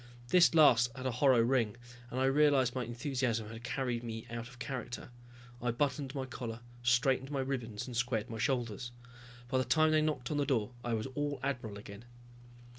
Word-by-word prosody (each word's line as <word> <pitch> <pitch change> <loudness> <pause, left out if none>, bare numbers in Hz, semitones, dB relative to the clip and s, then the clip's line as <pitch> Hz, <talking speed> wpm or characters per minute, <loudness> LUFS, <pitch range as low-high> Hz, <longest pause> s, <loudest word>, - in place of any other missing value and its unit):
This 175 +1 +6
last 125 -6 +6
had 130 - -6
a 130 - +1
hollow 125 0 +4
ring, 115 -3 +1 0.3
and 125 - -3
I 130 - +3
realized 135 -2 +4
my 130 - -2
enthusiasm 120 -2 -2
had 115 +1 -9
carried 125 -1 -2
me 115 -1 -5
out 115 0 -5
of 125 0 -14
character. 125 -2 -5 0.5
I 120 - 0
buttoned 135 +2 -1
my 135 -1 -2
collar, 120 -3 -6 0.2
straightened 130 +2 +2
my 140 -2 -1
ribbons 120 -6 -3
and 125 - -7
squared 120 -2 0
my 115 -2 -6
shoulders. 120 -2 -1 0.6
By 130 +1 +1
the - - +2
time 155 +6 +3
they 155 0 +4
knocked 150 -5 -1
on 150 - 0
the 145 - +2
door 115 -6 +1
I 120 -1 0
was 110 - -2
all 145 0 -2
admiral 120 -7 -3
again. 100 +2 -10
125 Hz, 190 wpm, -33 LUFS, 115-135 Hz, 0.6 s, This